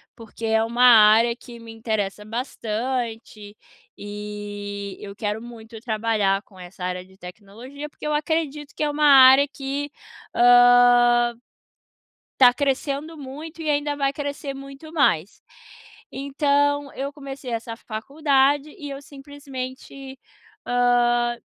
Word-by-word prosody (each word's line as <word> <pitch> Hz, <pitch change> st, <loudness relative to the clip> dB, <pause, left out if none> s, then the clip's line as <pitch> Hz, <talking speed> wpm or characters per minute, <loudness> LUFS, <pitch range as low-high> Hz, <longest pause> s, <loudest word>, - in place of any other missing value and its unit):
porque 225 Hz, 0 st, -9 dB
é 220 Hz, 0 st, +2 dB
uma 235 Hz, +2 st, 0 dB
área 230 Hz, 0 st, +6 dB
que 240 Hz, -1 st, -13 dB
me 230 Hz, 0 st, -11 dB
interessa 220 Hz, -3 st, -3 dB
bastante, 225 Hz, -2 st, -5 dB, 0.4 s
e 205 Hz, -1 st, -7 dB
eu 200 Hz, -1 st, -9 dB
quero 210 Hz, 0 st, -3 dB
muito 225 Hz, -1 st, -11 dB
trabalhar 215 Hz, -4 st, 0 dB
com 190 Hz, -4 st, -19 dB
essa 180 Hz, +1 st, -10 dB
área 180 Hz, 0 st, -4 dB
de 190 Hz, 0 st, -21 dB
tecnologia, 220 Hz, +11 st, -10 dB
porque -, -, -12 dB
eu 300 Hz, -, -1 dB
acredito 300 Hz, -1 st, -2 dB
que -, -, -2 dB
é 300 Hz, -, +1 dB
uma 300 Hz, +1 st, 0 dB
área 270 Hz, 0 st, +8 dB
que, 280 Hz, +1 st, -5 dB, 0.4 s
hã 245 Hz, 0 st, +5 dB, 1.1 s
tá 245 Hz, -2 st, +8 dB
crescendo 280 Hz, +3 st, -2 dB
muito 300 Hz, +4 st, -9 dB
e 310 Hz, -, -2 dB
ainda 290 Hz, 0 st, 0 dB
vai 275 Hz, -1 st, 0 dB
crescer 285 Hz, -1 st, -5 dB
muito 275 Hz, +3 st, -11 dB
mais, 205 Hz, -, +1 dB, 0.7 s
então 285 Hz, +1 st, 0 dB
eu 275 Hz, +1 st, -4 dB
comecei 275 Hz, -2 st, -9 dB
essa 230 Hz, 0 st, -4 dB
faculdade 275 Hz, +5 st, 0 dB
e 295 Hz, -5 st, -8 dB
eu 275 Hz, 0 st, -7 dB
simplesmente, 275 Hz, -1 st, -9 dB, 0.5 s
hã, 240 Hz, -1 st, +2 dB
245 Hz, 125 wpm, -23 LUFS, 220-280 Hz, 1.1 s, área